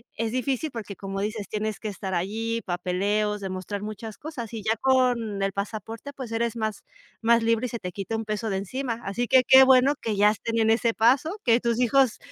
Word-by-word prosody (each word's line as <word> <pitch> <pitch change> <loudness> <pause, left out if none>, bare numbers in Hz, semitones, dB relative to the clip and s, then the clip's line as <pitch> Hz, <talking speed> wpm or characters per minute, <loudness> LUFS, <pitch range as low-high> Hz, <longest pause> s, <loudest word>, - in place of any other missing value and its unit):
es 225 0 -2
difícil, 260 +3 -1
porque, 215 -4 -7
como 195 +1 -5
dices, 210 0 -3
tienes 215 0 -3
que 215 - -4
estar 190 -2 -4
allí, 225 +6 -2
papeleos, 200 +4 -1
demostrar 190 +1 -4
muchas 215 0 -7
cosas, 275 -8 -7
y 220 - -5
ya 220 +1 +1
con 245 -6 +2
el 195 - 0
pasaporte, 220 +6 -5
pues 255 -5 -7
eres 230 0 -1
más 215 -2 -3 0.4
más 230 0 +4
libre 230 +2 +2
y - - -8
se 235 - -5
te 180 - -5
quita 200 +4 -4
un 225 - -2
peso 215 +1 -2
de 195 - -1
encima. 235 +4 -3
Así 235 +5 -2
que 260 -1 +5
qué 265 0 +9
bueno 265 +2 +5
que 220 -2 -2
ya 205 +1 +5
estén 230 +2 -3
en 220 - +3
ese 230 0 +2
paso, 270 - +2
que 235 0 +5
tus 235 0 0
hijos, 255 -1 +3
225 Hz, 215 wpm, -25 LUFS, 205-240 Hz, 0.4 s, qué